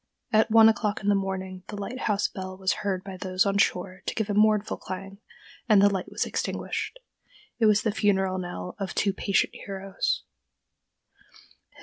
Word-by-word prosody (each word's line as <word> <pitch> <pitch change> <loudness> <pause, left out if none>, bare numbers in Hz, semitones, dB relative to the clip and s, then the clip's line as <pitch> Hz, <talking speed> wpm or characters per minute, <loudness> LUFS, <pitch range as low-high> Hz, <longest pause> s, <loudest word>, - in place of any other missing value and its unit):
At 220 +1 +4
one 225 0 +8
o'clock 220 -2 +1
in 205 - +1
the - - +5
morning 190 -1 -3
the 210 - -6
lighthouse 210 -1 -1
bell 185 -1 -7
was 190 0 +1
heard 190 -2 -1
by 190 -1 -8
those 185 +1 +1
on 200 0 +1
shore 185 0 0
to - - -2
give 220 -2 -1
a - - 0
mournful 215 0 +3
clang, 195 +1 -7 0.5
and 210 -2 +7
the 200 +1 +5
light 190 -2 -3
was - - -1
extinguished. - - -3 0.6
It 225 - +5
was 210 -1 +4
the 220 - +1
funeral 190 -3 +1
knell 175 - -6
of 195 -1 -4
two 200 -2 +1
patient 200 +1 +1
heroes. 195 -1 -3
195 Hz, 175 wpm, -26 LUFS, 190-210 Hz, 0.6 s, one